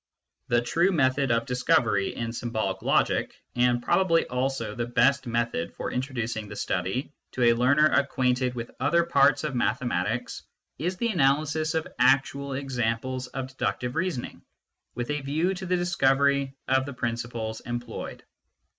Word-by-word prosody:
The 120 -1 +2
true 170 +9 +2
method 135 -4 +2
of 115 0 +1
discovery 125 -6 +1
in 115 0 -3
symbolic 110 -5 -2
logic, - - +1 0.2
and 120 0 +2
probably 165 0 +3
also 130 -3 -2
the 120 +1 -3
best 135 +2 +2
method 115 -7 -1
for - - -4
introducing 120 -4 -3
the 105 - -7
study 95 +10 -2 0.2
to 125 - 0
a 120 0 +6
learner 130 +6 +4
acquainted 130 -3 +1
with 115 -1 -5
other 150 +6 +3
parts 140 -4 +3
of 150 -3 -2
mathematics, 120 0 -1 0.4
is 180 +5 -2
the 235 +5 0
analysis 155 -1 +1
of 160 - -1
actual 135 +2 +2
examples 130 -1 -2
of 130 0 -5
deductive 125 -1 -2
reasoning, 165 -7 -3 0.5
with 120 +3 -3
a 150 0 -2
view 155 +7 0
to 190 0 -6
the 180 0 +2
discovery 140 -5 +2
of 130 +1 +2
the 140 - -5
principles 115 -2 -3
employed. 120 -1 -6
130 Hz, 145 wpm, -26 LUFS, 120-145 Hz, 0.5 s, a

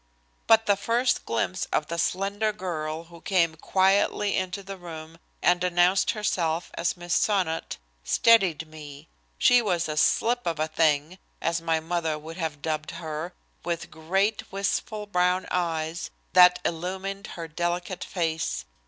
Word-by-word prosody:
But 225 0 +6
the 205 - +4
first 235 +5 0
glimpse 95 -5 -1
of 150 - +1
the 170 +2 -4
slender 200 +5 0
girl 165 -5 -4
who 170 0 -15
came 170 -4 +2
quietly 195 +4 +2
into 185 +1 -2
the 195 0 -7
room 165 -2 -10 0.2
and 175 0 +3
announced 180 +2 +3
herself 175 -6 -1
as 170 - -1
Miss 175 0 -3
Sonnot 185 -6 0 0.3
steadied 185 - +4
me. 150 - -11 0.3
She 245 0 +5
was 175 -6 0
a 155 - -3
"slip 240 +9 +2
of 165 -2 -1
a 155 - +1
thing," 155 +2 +1 0.2
as 170 0 -1
my 165 -1 +1
mother 165 -1 -1
would 160 +2 -9
have 155 -4 -4
dubbed 155 -1 -2
her, 160 +1 -5 0.3
with 170 -1 -3
great, 195 +8 -1
wistful 205 +2 -2
brown 180 -1 +1
eyes 165 -2 -2 0.2
that 180 0 +8
illumined 190 +4 -3
her 165 -1 -5
delicate 175 +3 -3
face. 160 - -2
175 Hz, 145 wpm, -26 LUFS, 160-195 Hz, 0.3 s, that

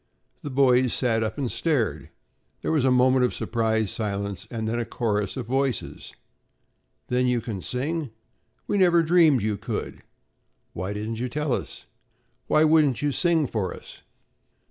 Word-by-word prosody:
The 145 - -6
boys 130 -2 +3
sat 115 -3 +1
up 110 0 -3
and 130 -4 -2
stared. 110 - -1 0.5
There - - -1
was 155 -5 +2
a 130 - +4
moment 130 0 +4
of 125 - 0
surprised 110 -3 0
silence 100 -2 -3
and 110 -2 -4
then 115 +2 -1
a - - 0
chorus 105 -3 -2
of 125 - -4
voices: 130 -1 -2 0.9
"Then 125 0 +1
you 125 -1 +2
can 105 -4 -5
sing?" 145 - -2 0.6
"We 205 - 0
never 175 -2 +5
dreamed 160 - +4
you 105 -1 -1
could." - - -5 0.7
"Why 95 +3 -4
didn't 110 +2 -4
you 125 +1 -2
tell 150 0 -1
us?" - - -5 0.6
"Why 155 - +4
wouldn't 155 -4 +3
you 145 - +1
sing 165 0 +2
for 105 -8 -3
us?" - - -13
125 Hz, 160 wpm, -25 LUFS, 110-145 Hz, 0.9 s, never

